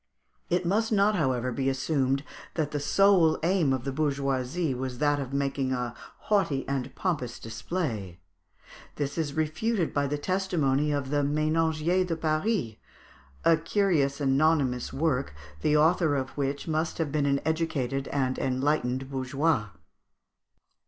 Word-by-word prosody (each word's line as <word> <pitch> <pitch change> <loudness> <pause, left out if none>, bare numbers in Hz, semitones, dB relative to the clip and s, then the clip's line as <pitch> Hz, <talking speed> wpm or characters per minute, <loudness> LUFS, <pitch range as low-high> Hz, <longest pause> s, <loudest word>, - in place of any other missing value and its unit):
It 180 +1 +1
must 220 +6 +1
not, 210 0 +3
however, 130 -7 0
be 135 +2 0
assumed 135 0 0 0.3
that 150 -3 -1
the 145 - -1
sole 175 0 +4
aim 170 -5 +2
of 130 -2 -1
the 135 - -2
bourgeoisie 140 +1 -1
was 130 0 -4
that 145 0 +2
of 135 -2 -5
making 140 -1 -1
a 125 -2 -2 0.3
haughty 190 -10 +1
and 135 -2 -3
pompous 140 -10 -2
display. 110 - -4 0.8
This 140 -1 -3
is 155 -3 -2
refuted 160 +5 0
by 140 -1 +1
the 145 +1 -1
testimony 150 -5 0
of 140 -2 -2
the 145 0 +2
"Ménagier 155 +4 +1
de 165 - -1
Paris," 155 - -1 0.7
a 165 - +6
curious 165 -5 +1
anonymous 140 -2 +2
work, 135 - -1 0.3
the 150 0 +3
author 160 -1 +3
of 130 -1 -2
which 140 +1 -3
must 160 0 -1
have 160 -4 -1
been 145 -1 +1
an 140 0 +2
educated 140 -5 -1
and 130 -2 -1
enlightened 130 -1 0
bourgeois. 135 -2 0
145 Hz, 140 wpm, -28 LUFS, 135-165 Hz, 0.8 s, a